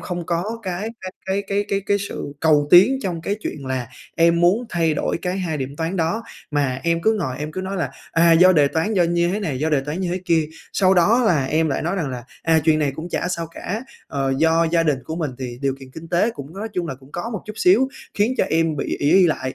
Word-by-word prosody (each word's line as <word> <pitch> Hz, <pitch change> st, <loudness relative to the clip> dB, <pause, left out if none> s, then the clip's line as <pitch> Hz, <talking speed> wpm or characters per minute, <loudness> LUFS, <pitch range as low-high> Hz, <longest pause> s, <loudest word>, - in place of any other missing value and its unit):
không 175 Hz, -2 st, -5 dB
có 180 Hz, +7 st, -2 dB
cái 190 Hz, +2 st, -3 dB
cái 185 Hz, 0 st, -6 dB
cái 195 Hz, +1 st, 0 dB
cái 200 Hz, +1 st, 0 dB
cái 200 Hz, 0 st, 0 dB
cái 200 Hz, -, +2 dB
sự 200 Hz, -7 st, -5 dB
cầu 150 Hz, -2 st, +3 dB
tiến 205 Hz, +10 st, +7 dB
trong 175 Hz, -4 st, -3 dB
cái 200 Hz, +5 st, -2 dB
chuyện 140 Hz, -9 st, -5 dB
là 130 Hz, -2 st, -3 dB, 0.3 s
em 170 Hz, 0 st, +4 dB
muốn 190 Hz, +8 st, +3 dB
thay 165 Hz, -5 st, +1 dB
đổi -, -, -1 dB
cái 185 Hz, +1 st, -2 dB
2 165 Hz, -4 st, -2 dB
điểm 135 Hz, +1 st, -5 dB
toán 165 Hz, +4 st, -2 dB
đó, 170 Hz, +7 st, 0 dB, 0.3 s
mà 140 Hz, -3 st, 0 dB
em 170 Hz, 0 st, 0 dB
cứ 220 Hz, -, +4 dB
ngồi 130 Hz, -3 st, -3 dB
em 150 Hz, +1 st, -5 dB
cứ 185 Hz, -, -4 dB
nói 190 Hz, +1 st, -4 dB
là, 175 Hz, -, -2 dB, 0.2 s
à, 165 Hz, 0 st, +5 dB
do 180 Hz, +3 st, +7 dB
đề 150 Hz, -5 st, +4 dB
toán, 165 Hz, +9 st, -1 dB
do 185 Hz, -, +4 dB
như 170 Hz, 0 st, +1 dB
thế 200 Hz, +4 st, -1 dB
này, 150 Hz, -10 st, -2 dB
do 155 Hz, +3 st, 0 dB
đề 145 Hz, -, +3 dB
toán 150 Hz, +6 st, -4 dB
như 185 Hz, -, -1 dB
thế 185 Hz, -, -2 dB
kia, 160 Hz, -3 st, +2 dB, 0.2 s
sau 190 Hz, -1 st, +3 dB
đó 210 Hz, +8 st, +4 dB
là 155 Hz, -9 st, +3 dB
em 155 Hz, +4 st, +1 dB
lại 140 Hz, -, -1 dB
nói 170 Hz, +5 st, -1 dB
rằng 165 Hz, -7 st, -1 dB
là 125 Hz, -2 st, -6 dB, 0.2 s
"À, 165 Hz, -1 st, +3 dB
chuyện 155 Hz, -1 st, +4 dB
này 145 Hz, -3 st, 0 dB
cũng 160 Hz, +2 st, -6 dB
chả 175 Hz, -, -2 dB
sao 170 Hz, -2 st, -3 dB
cả." 205 Hz, +6 st, -5 dB, 0.2 s
Ờ, 135 Hz, -1 st, -1 dB
do 165 Hz, +1 st, +3 dB
gia 170 Hz, -1 st, +3 dB
đình 150 Hz, -5 st, +1 dB
của 160 Hz, -, -5 dB
mình 160 Hz, -5 st, -2 dB
thì 125 Hz, -2 st, -6 dB
điều 135 Hz, -1 st, +1 dB
kiện 130 Hz, -1 st, -11 dB
kinh 160 Hz, +5 st, -10 dB
tế 180 Hz, +7 st, +2 dB
cũng 145 Hz, -4 st, -10 dB
nói 210 Hz, +3 st, -5 dB
chung 180 Hz, -3 st, -2 dB
là 135 Hz, -, -4 dB
cũng 130 Hz, +2 st, -19 dB
có 175 Hz, +7 st, -4 dB
một 215 Hz, -5 st, -5 dB
chút 215 Hz, -, -7 dB
xíu 360 Hz, -, +4 dB, 0.3 s
khiến 215 Hz, +5 st, +1 dB
cho -, -, +4 dB
em 165 Hz, -1 st, +1 dB
bị 140 Hz, -, -2 dB
ỷ 145 Hz, -, +1 dB
y 185 Hz, 0 st, +6 dB
lại. 130 Hz, -5 st, -2 dB
170 Hz, 270 wpm, -21 LUFS, 150-190 Hz, 0.3 s, tiến